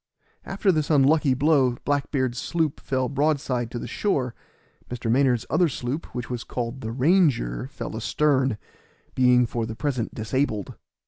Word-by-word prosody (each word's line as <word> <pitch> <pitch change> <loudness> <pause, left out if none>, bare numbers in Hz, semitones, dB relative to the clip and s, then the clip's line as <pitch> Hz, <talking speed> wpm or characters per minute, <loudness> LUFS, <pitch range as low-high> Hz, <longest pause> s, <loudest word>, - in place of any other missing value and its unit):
After 195 0 +1
this 155 -4 -1
unlucky 145 -1 +4
blow 135 -3 +3
Black 145 -1 0
beard's 130 -4 -1
sloop 160 -4 -1
fell 130 -1 -1
broadside 140 -4 0
to 120 - -6
the - - -5
shore; 125 - -1 0.6
Mr. 120 -2 -2
Maynard's 125 -2 +2
other 175 -3 +2
sloop, 130 +4 -4
which 120 -1 -4
was 125 -2 -4
called 120 +1 -4
the 110 - -4
Ranger, 130 - +2
fell - - -7
astern, 135 -6 +1 0.6
being 125 -1 +4
for 115 -1 -3
the 110 - -6
present 130 -4 -2
disabled. 110 -1 -2
130 Hz, 150 wpm, -24 LUFS, 120-145 Hz, 0.6 s, unlucky